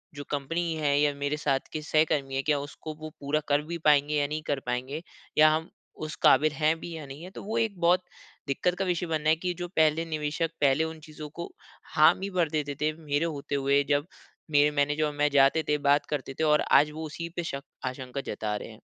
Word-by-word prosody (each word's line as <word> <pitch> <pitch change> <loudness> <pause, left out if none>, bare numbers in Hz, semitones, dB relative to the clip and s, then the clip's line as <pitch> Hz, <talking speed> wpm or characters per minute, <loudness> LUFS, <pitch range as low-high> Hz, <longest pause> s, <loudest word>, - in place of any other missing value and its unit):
जो 145 - -6
कंपनी 165 +4 -1
है 145 -2 +1
या 145 -1 +3
मेरे 145 +1 -2
साथ 135 -2 +1
के 155 - -3
सहकर्मी 150 -3 +1
हैं, 135 - 0
क्या 150 -2 +2
उसको 155 +2 -7
वो 155 - -5
पूरा 145 +2 0
कर 145 +1 +3
भी 170 +2 -5
पाएँगे 150 0 +4
या 145 -1 +2
नहीं 155 +1 -3
कर 140 -2 0
पाएँगे, 130 +6 -3 0.3
या 155 0 +8
हम 160 +3 -1 0.4
उस 155 - -6
काबिल 150 +3 +6
हैं 155 +3 +1
भी 170 - -7
या 150 - -7
नहीं 140 +4 -10
हैं? 185 - -9
तो - - -7
वो 220 +3 -3
एक 215 -5 0
बहुत 180 +2 +4 0.4
दिक्कत 180 +6 0
का 195 - +1
विषय 175 -1 0
बना 155 -1 0
है 160 - +5
कि 180 +1 -2
जो 175 - -3
पहले 160 +1 +3
निवेशक 155 +1 -2
पहले 140 +2 +4
उन 160 0 -5
चीज़ों 155 -1 -9
को 170 +3 -7 0.4
हामी 180 +5 +5
भर 165 -3 +3
देते 150 -2 -2
थे, 155 0 +1
मेरे 145 +2 0
होते 145 -3 -3
हुए, 140 +1 +3
जब 145 +2 +2 0.4
मेरे 145 0 +5
मैनेजर 145 +1 +1
और 150 - -2
मैं 150 0 +2
जाते 140 +3 +5
थे, 150 - +3
बात 145 0 +3
करते 135 -2 -3
थे 160 - +1
और 150 -1 +4
आज 150 +1 +6
वो 160 +1 -6
उसी 170 +2 -6
पे 175 - -2
शक 140 +1 -5 0.2
आशंका 130 +1 -5
जता 105 0 -2
रहे - - -6
हैं। - - -13
150 Hz, 230 wpm, -28 LUFS, 145-160 Hz, 0.4 s, या